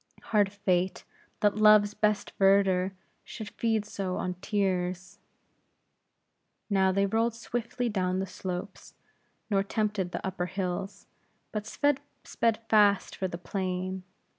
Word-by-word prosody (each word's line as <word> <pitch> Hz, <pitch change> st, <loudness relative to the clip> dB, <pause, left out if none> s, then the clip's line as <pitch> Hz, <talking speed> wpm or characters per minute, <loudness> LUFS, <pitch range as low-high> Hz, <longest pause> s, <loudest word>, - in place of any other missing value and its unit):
Hard 205 Hz, -2 st, +4 dB
fate, 185 Hz, -2 st, 0 dB, 0.4 s
that 205 Hz, 0 st, +3 dB
Love's 215 Hz, -1 st, +6 dB
best 210 Hz, -1 st, 0 dB
verdure 195 Hz, -1 st, +4 dB, 0.3 s
should 220 Hz, -2 st, -8 dB
feed 225 Hz, -2 st, 0 dB
so 195 Hz, -3 st, -3 dB
on 180 Hz, -, -2 dB
tears!" 185 Hz, -3 st, -1 dB, 1.5 s
Now 190 Hz, -1 st, +4 dB
they 200 Hz, +1 st, +2 dB
rolled 225 Hz, +3 st, +1 dB
swiftly 240 Hz, +1 st, -3 dB
down 185 Hz, -4 st, 0 dB
the 190 Hz, -, -1 dB
slopes; 185 Hz, 0 st, -6 dB, 0.6 s
nor 195 Hz, -1 st, +3 dB
tempted 205 Hz, -2 st, -1 dB
the -, -, -4 dB
upper 180 Hz, -2 st, -2 dB
hills; 190 Hz, +1 st, -4 dB, 0.5 s
but 210 Hz, 0 st, -4 dB
sped 285 Hz, +2 st, +1 dB, 0.7 s
fast 205 Hz, -2 st, +4 dB
for 190 Hz, -, -2 dB
the 170 Hz, -, -6 dB
plain. 185 Hz, 0 st, -3 dB
195 Hz, 120 wpm, -29 LUFS, 185-210 Hz, 1.5 s, Love's